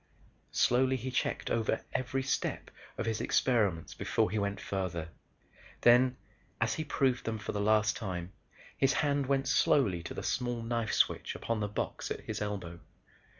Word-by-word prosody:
Slowly 130 +2 +3
he 130 +1 -4
checked 125 - -1
over 115 -2 0
every 130 +1 -1
step 135 - -2 0.3
of - - -2
his 115 -1 -1
experiments 105 -10 +1
before - - 0
he 110 - 0
went 100 -1 -1
farther. 90 -4 -3 0.7
Then, 125 +1 +5 0.4
as 115 0 +1
he 155 - -2
proved 135 -4 +1
them 115 -1 -1
for 110 - -4
the 100 - -2
last 105 0 +3
time, 95 -4 -5 0.4
his 135 0 +3
hand 145 -2 +1
went 135 0 +1
slowly 100 -12 +3
to 85 - -7
the - - -5
small 120 -2 -1
knife 115 -1 -1
switch - - +1
upon 115 -1 -2
the 105 - 0
box 105 - -3
at - - -4
his - - -5
elbow. 95 -5 -4
115 Hz, 165 wpm, -31 LUFS, 100-130 Hz, 0.7 s, Then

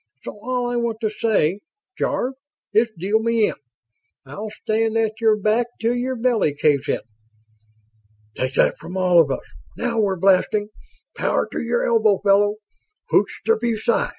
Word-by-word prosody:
"So - - -5
all 250 0 -2
I 245 - -1
want 235 -2 -1
to 215 -2 0
say, 205 -5 +1 0.4
Jarve, 255 +2 -1 0.4
is 225 +2 +4
deal 200 +6 +1
me 230 -1 +2
in. - - -4 0.7
I'll 205 +11 -7
stand 220 +1 -1
at 220 0 -1
your 220 -2 +4
back 215 +3 +1
'til 230 +1 +1
your 250 +1 -2
belly 230 - +1
caves 145 -2 +1
in." - - 0 1.3
"Take 130 +1 -2
that - - +2
from 180 +2 -7
all 180 -2 +5
of 150 - 0
us!" 135 - -3 0.3
"Now 235 -1 -1
we're 200 -3 +1
blasting!" 195 +3 +2 0.5
"Power - - 0
to - - -3
your 240 0 0
elbow, 220 -4 +3
fella!" 205 +1 +4 0.6
"Hoch - - +4 0.2
der 455 - +3
BuSci!" 230 -1 0
220 Hz, 160 wpm, -21 LUFS, 195-235 Hz, 1.3 s, all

